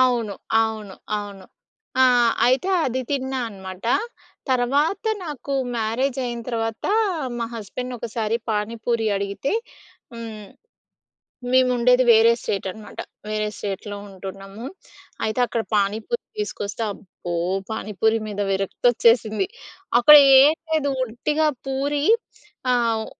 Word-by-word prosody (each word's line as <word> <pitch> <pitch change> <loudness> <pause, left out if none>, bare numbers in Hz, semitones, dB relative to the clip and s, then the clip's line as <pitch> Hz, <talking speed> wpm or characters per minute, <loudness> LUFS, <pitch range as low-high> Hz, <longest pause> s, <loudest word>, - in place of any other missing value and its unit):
అవును. 240 -5 +2 0.3
అవును. 215 -3 -4 0.2
అవును. 200 -2 -8 0.6
ఆ! - - +8 0.4
అయితే 260 +9 +2 0.2
అది 260 0 -1
తిన్నా 265 -1 -1
అనమాట. 190 -1 -10 0.7
తర్వాత 280 - +1 0.2
నాకు 285 -2 -6 0.2
మ్యారేజైన 240 +2 -1
తర్వాత, 225 -1 -3 0.5
మా 230 - -1
హస్బెండ్‌ని 245 +4 -5
ఒకసారి 225 -1 -2
పానీపూరి 225 +2 -1
అడిగితే, 200 - -2 0.6
హ్మ్ 220 -3 -8 1.1
మేముండేది 250 -1 +4
వేరే 225 +1 +6
స్టేట్ 195 -1 -2
అనమాట, 215 +2 -12 0.3
వేరే 215 0 -1
స్టేట్‌లో 205 +1 -5
ఉంటున్నాము. 195 +3 -9 0.6
అయితే, 220 +3 -2
అక్కడ 230 -1 -2
పానీపూరి 215 - 0 0.2
తీసుకొస్తే, 225 - -3
అబ్బో! 175 -3 -7 0.4
పానీపూరి 220 +1 0
మీద 205 -1 -3
విరక్తోచ్చేసింది. 225 - +2 0.5
అక్కడ 300 +5 +9 0.3
ఏం 295 +3 +6 0.2
లేదు. 285 -3 +1
ఉట్టిగా 300 +7 0 0.2
పూరి 285 +2 -1 0.7
ఆహ్, 230 -2 +1
230 Hz, 100 wpm, -23 LUFS, 210-255 Hz, 1.1 s, అక్కడ